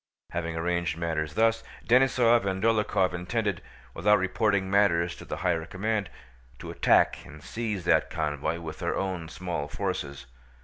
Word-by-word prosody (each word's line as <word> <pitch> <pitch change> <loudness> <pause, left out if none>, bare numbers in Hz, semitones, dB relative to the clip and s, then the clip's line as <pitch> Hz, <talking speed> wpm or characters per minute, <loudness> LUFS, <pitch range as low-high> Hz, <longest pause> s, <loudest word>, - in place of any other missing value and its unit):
Having 85 -1 -3
arranged 85 -1 -1
matters 80 -2 -2
thus, 115 0 +2 0.2
Denísov 120 -2 +4
and 95 0 -2
Dólokhov 105 -5 +2
intended, 100 +1 -2 0.3
without 105 +5 +4
reporting 95 +1 +1
matters 90 -4 +2
to - - -10
the - - -5
higher 85 -2 +1
command, 105 0 -2 0.5
to - - -8
attack - - +3
and 75 0 -13
seize 105 -6 -4
that - - +3
convoy 75 +1 -2
with 80 -2 -7
their - - -1
own 90 -4 -3
small 85 -4 -4
forces. 75 -6 -4
90 Hz, 145 wpm, -27 LUFS, 85-105 Hz, 0.5 s, Denísov